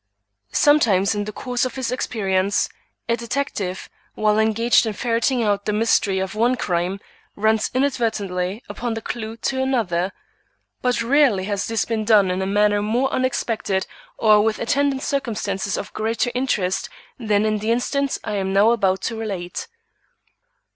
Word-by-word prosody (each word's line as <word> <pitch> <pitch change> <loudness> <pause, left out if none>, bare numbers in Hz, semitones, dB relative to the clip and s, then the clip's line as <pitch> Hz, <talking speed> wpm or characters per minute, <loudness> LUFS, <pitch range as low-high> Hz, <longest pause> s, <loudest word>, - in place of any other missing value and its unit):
Sometimes 220 -11 +4
in 205 -1 -2
the 215 - -5
course 245 +3 -2
of 255 - -2
his 260 -3 -2
experience, 200 -6 0 0.4
a 235 - +2
detective, 235 -6 -3 0.3
while 215 0 +2
engaged 225 +2 +3
in 220 - -2
ferreting 235 +3 0
out 205 -2 0
the - - 0
mystery 210 -2 +2
of 190 +1 -2
one 235 +4 +2
crime, 180 -3 -1 0.4
runs 220 +1 +1
inadvertently 220 -7 -1
upon 240 -2 -4
the 225 - -4
clue 225 -1 -5
to 260 +3 -1
another. 200 -9 0 0.7
But 250 -2 +1
rarely 250 -6 +3
has 200 0 -2
this 225 -2 0
been 225 -2 -1
done 205 -4 +4
in 185 +1 -1
a 190 - -1
manner 205 +1 +2
more 240 +6 0
unexpected 230 -6 -1 0.3
or 215 -2 +5
with 220 0 +1
attendant 275 +2 0
circumstances 205 -8 -2
of - - -6
greater 230 +3 -1
interest 200 -8 -1 0.3
than 215 -3 +1
in 215 -1 +1
the 215 +2 -3
instance 275 +3 0
I 210 - -2
am 190 -1 -1
now 200 +4 +5
about 190 -5 +1
to 230 - -2
relate. 195 -6 -5
220 Hz, 155 wpm, -22 LUFS, 200-240 Hz, 0.7 s, or